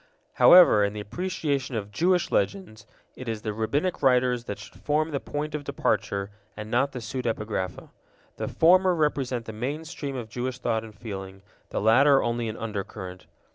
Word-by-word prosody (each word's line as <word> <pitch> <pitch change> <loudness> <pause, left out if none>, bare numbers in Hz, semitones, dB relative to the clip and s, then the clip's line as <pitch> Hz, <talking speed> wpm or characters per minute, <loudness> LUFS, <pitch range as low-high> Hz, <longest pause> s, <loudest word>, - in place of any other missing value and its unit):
However, 175 - +8
in 100 0 0
the 105 - -5
appreciation 140 - -3
of 105 -2 -4
Jewish 175 - +1
Legends, 115 - -2 0.3
it 130 -2 -7
is 110 -1 -4
the 110 -1 -2
Rabbinic 140 - -1
writers 125 -2 +3
that 100 - -5
should 105 - -13
form 155 +2 0
the 140 - -1
point 150 +2 -4
of 150 -1 -3
departure, 100 -7 -1 0.3
and 105 +1 -7
not 135 +4 +2
the 130 - -7
pseudepigrapha. 110 -6 -3 0.5
The - - -3
former 185 +2 +4
represent 135 -6 0
the 110 - -7
main 140 +9 -4
stream 145 -4 -5
of 120 -3 -5
Jewish 125 +2 -4
thought 115 -3 -1
and 110 -2 -11
feeling, 95 -3 -8 0.3
the - - -2
latter 135 +6 +5
only 115 -1 -1
an 110 - -6
undercurrent. 100 -4 -6
120 Hz, 175 wpm, -26 LUFS, 110-145 Hz, 0.5 s, However